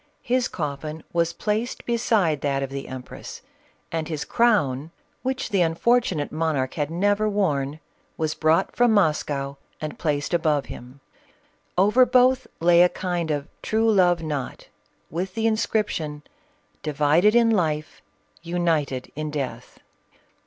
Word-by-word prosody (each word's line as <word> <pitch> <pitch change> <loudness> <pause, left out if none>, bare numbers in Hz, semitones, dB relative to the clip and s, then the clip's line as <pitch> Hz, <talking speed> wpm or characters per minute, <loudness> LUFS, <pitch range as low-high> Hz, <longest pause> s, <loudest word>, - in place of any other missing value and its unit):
His 250 +1 +1
coffin 150 0 -5
was 170 -1 +2
placed 220 +3 -2
beside 215 - +1
that 140 -1 0
of 135 - -5
the. 135 0 -5
em 130 -1 -6
press, - - -10 0.5
and 160 -2 -2
his 155 -3 -4
crown, 160 - +2 0.3
which 260 0 -2
the 200 -4 +2
unfortunate 170 -1 +1
monarch 155 -5 -1
had 150 -2 -2
never 205 +5 +1
worn, 150 -8 0 0.4
was 155 -1 -1
brought 160 +4 +1
from 245 -2 +4
Moscow 145 -7 +1 0.2
and 155 -1 -6
placed 145 0 -1
above 155 -4 +2
him; 125 +3 -11 0.8
over 210 +7 +5
both 255 +1 +3
lay 170 +1 +5
a 180 - +6
kind 175 -3 -3
of 145 -1 -2
true 225 +1 +2
love 175 -4 +3
knot 145 -5 -5 0.4
with 185 +4 -3
the 225 - -1
inscription, 210 -9 -1 0.3
" - - -40
Divided 155 +8 +3
in 230 -1 +5
life, 155 -7 -1 0.4
united 165 -6 -1
in 155 +1 -3
death." 130 -5 -5
165 Hz, 140 wpm, -24 LUFS, 150-210 Hz, 0.8 s, a